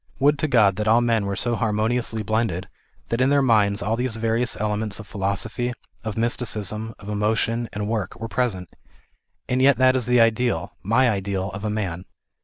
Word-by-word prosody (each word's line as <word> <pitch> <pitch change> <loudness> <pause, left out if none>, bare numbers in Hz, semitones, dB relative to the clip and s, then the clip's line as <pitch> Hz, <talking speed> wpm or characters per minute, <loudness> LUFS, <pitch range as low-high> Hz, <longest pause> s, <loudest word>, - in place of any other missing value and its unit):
Would 145 +2 +3
to 155 - +1
God 105 -8 +4
that 105 0 -2
all 115 +2 +5
men 115 -4 +1
were 100 - -2
so 120 +4 -1
harmoniously 110 +1 -1
blended 110 -5 -1 0.4
that 115 +2 0
in 130 - +4
their 140 -1 +3
minds 105 -4 +3
all 110 +2 0
these 125 -1 -1
various 115 0 -1
elements 105 -1 -2
of 110 - -8
philosophy, 105 +4 -2 0.3
of 110 -1 -4
mysticism, 110 -2 -2
of 100 - -13
emotion 110 +3 0
and 105 0 -3
work 110 -3 -3
were 115 - -4
present; 110 -7 -2 0.8
and 125 +1 +1
yet 140 +1 +5
that 130 0 +4
is 125 -2 0
the 125 0 +4
ideal, 115 -6 +1
my 115 +6 +3
ideal, 100 -3 -1
of 100 +1 -7
a 105 - -1
man. 95 -4 -3
110 Hz, 190 wpm, -23 LUFS, 105-120 Hz, 0.8 s, all